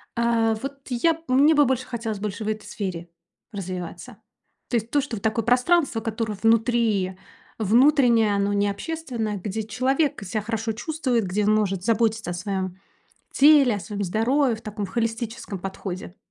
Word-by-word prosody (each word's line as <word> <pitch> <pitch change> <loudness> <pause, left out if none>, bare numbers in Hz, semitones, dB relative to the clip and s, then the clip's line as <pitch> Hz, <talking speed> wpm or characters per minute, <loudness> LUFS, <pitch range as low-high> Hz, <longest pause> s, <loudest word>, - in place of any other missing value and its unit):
А 230 -1 +2
вот 275 +1 -5
я 255 +7 +2
б 320 - -12
мне 285 +5 +5
бы 290 -1 +5
больше 260 0 0
хотелось 225 -4 -4
больше 210 +1 -4
в - - -5
этой 215 0 -4
сфере 180 -4 -5 0.4
развиваться. 185 +3 -6 0.5
То - - -1
есть 225 +1 -4
то, 290 - +3
что 270 -4 -5
вот 205 - -8
такое 220 0 0
пространство, 250 +1 +2
которое 220 -2 -3
внутри, 225 -4 +2 0.4
внутреннее, 235 -1 +4
оно 200 0 +1
не 205 0 +2
общественное. 235 -3 -4
Где 205 +3 -4
человек 260 +6 0
себя 205 +3 -2
хорошо 225 +1 -2
чувствует, 250 -2 -1
где 200 +3 0
он 215 +1 +4
может 195 -4 0
заботиться 225 -2 +1
о - - -3
своём 185 0 -3 0.6
теле, 280 -4 +6
о - - -5
своём 205 0 -4
здоровье 235 +6 +1
в 220 - -14
таком 210 -2 -4
в - - -13
холистическом 230 -1 -3
подходе. 185 0 -6
225 Hz, 170 wpm, -24 LUFS, 205-245 Hz, 0.6 s, теле